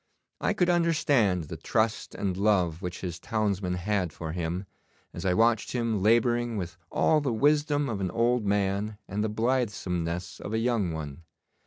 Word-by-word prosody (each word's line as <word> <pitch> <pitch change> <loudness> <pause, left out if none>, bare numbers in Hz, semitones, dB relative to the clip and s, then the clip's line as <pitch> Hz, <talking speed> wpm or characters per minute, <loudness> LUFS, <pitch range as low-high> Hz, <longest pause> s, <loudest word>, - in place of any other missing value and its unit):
I - - +1
could 180 -4 +2
understand 145 - +2
the 80 +1 -7
trust 110 +6 -1
and 95 -3 -1
love 95 -4 +2
which 90 -2 -5
his 85 -3 -4
townsmen 100 -4 -1
had 90 -1 -1
for 80 +1 -6
him, 85 +3 -3 0.5
as 85 - -6
I 90 -1 +2
watched 115 +1 +2
him 115 -5 0
labouring 120 +2 +2
with 90 -2 -4
all 155 -1 +3
the 140 -3 0
wisdom 145 +4 +2
of 105 -6 -3
an 95 - 0
old 120 +4 +1
man 100 +1 0
and 105 +2 -2
the 110 - 0
blithesomeness 100 -7 -1
of 105 - -6
a - - +2
young 115 -6 +1
one. 75 -1 -6
105 Hz, 170 wpm, -28 LUFS, 90-120 Hz, 0.5 s, all